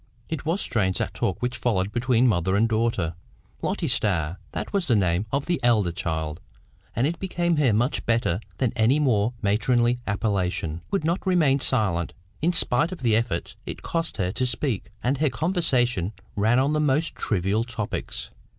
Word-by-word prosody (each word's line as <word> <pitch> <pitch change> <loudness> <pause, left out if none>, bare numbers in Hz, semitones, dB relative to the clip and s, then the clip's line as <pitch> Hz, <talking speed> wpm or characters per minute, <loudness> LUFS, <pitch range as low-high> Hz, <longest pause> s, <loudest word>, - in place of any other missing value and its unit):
It 155 -1 -4
was 175 +5 +1
strange 95 -5 +1
that - - -2
talk 95 - -2
which 125 0 0
followed 100 -5 0
between 120 +1 +2
mother 95 -3 +2
and 110 +3 +3
daughter. 110 -7 0 0.5
Lotty - - -1
Starr 85 -4 0
(that - - -5
was 195 -4 0
the 120 - +4
name 95 0 +1
of 140 +1 0
the 175 -1 0
elder 110 -7 +3
child, 80 0 -3 0.5
and 120 - +2
it 165 +3 -1
became 175 -3 0
her 140 -5 +4
much 120 +6 +1
better 115 -6 +1 0.2
than 125 -3 0
any 120 +4 +3
more 120 -5 +2
matronly 120 +4 +2
appellation), 95 -6 -1
would 195 -5 0
not 170 +4 0
remain 155 -7 +4
silent, 100 -11 +1 0.3
in 170 +3 +3
spite 160 -1 +2
of 185 - -7
the 115 -3 +3
efforts 110 -7 -1
it - - -6
cost 165 0 -2
her 90 -2 0
to 130 +5 -1
speak, 120 -5 -2
and 130 +2 +1
her 155 -1 +3
conversation 125 - +1 0.2
ran 110 +4 +3
on 135 +3 +2
the 155 - +1
most 150 +2 +1
trivial 100 +2 0
topics. 115 -3 -4
120 Hz, 180 wpm, -25 LUFS, 100-140 Hz, 0.5 s, the